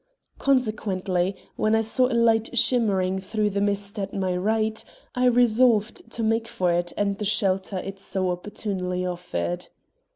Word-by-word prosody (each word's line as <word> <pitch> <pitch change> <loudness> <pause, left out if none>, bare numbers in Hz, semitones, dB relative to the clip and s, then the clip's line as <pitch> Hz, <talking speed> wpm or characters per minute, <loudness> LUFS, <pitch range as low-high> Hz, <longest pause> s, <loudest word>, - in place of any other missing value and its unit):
Consequently, 200 -8 0 0.2
when 215 +1 +2
I 225 - +3
saw 235 +3 +3
a 245 -2 0
light 230 +1 +2
shimmering 195 -7 +2
through 210 +2 -1
the 200 +1 -1
mist 200 +1 -1
at 195 0 -4
my 185 -2 -1
right, 220 +3 0 0.3
I 250 0 +1
resolved 235 -2 +3
to 230 - -3
make 225 +1 +1
for 180 -5 0
it 175 0 0
and 200 -1 0
the - - -2
shelter 195 -2 0
it 195 +1 -6
so 190 -1 -1
opportunely 180 -1 -3
offered. 130 - -3
205 Hz, 155 wpm, -25 LUFS, 185-225 Hz, 0.3 s, I